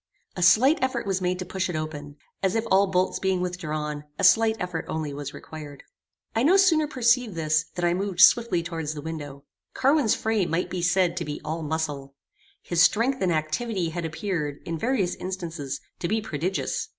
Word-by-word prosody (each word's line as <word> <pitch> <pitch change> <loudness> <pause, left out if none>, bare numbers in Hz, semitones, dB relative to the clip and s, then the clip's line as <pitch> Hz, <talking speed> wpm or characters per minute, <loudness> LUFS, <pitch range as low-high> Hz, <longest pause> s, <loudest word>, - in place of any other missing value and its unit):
A 180 - -4
slight 255 - +5
effort 260 0 -1
was 190 -1 -1
made 180 0 0
to 185 - -5
push 190 +1 -2
it 175 - -3
open, 150 -2 -5 0.3
as 190 +1 +1
if 225 0 0
all 195 +1 +5
bolts 185 0 0
being 190 -1 0
withdrawn, 155 -5 -3
a - - -3
slight 225 -1 +5
effort 180 -3 -3
only 155 -2 -3
was 145 0 -6
required. 150 -3 -10 0.5
I 225 - +2
no 335 +9 +5
sooner 330 -6 +4
perceived 245 - +2
this, 155 -1 +1
than 175 - -1
I 175 - +3
moved 190 -1 -3
swiftly 205 -3 +5
towards 165 -3 -4
the 145 - -6
window. 145 -4 -7 0.3
Carwin's 275 -4 +3
frame 220 -5 0
might 165 +3 -1
be 180 - -2
said 175 0 +2
to 170 - -2
be 150 0 -5
all 160 +2 -3
muscle. 145 -3 -3 0.5
His 175 -1 +1
strength 250 +8 +3
and 185 -2 +2
activity 165 +4 -1
had 170 +1 -4
appeared, 155 -3 -3
in 165 - -3
various 225 -6 0
instances, 165 -7 -5 0.2
to 170 - -2
be 220 +4 +1
prodigious. 185 -2 -3
180 Hz, 190 wpm, -25 LUFS, 155-205 Hz, 0.5 s, slight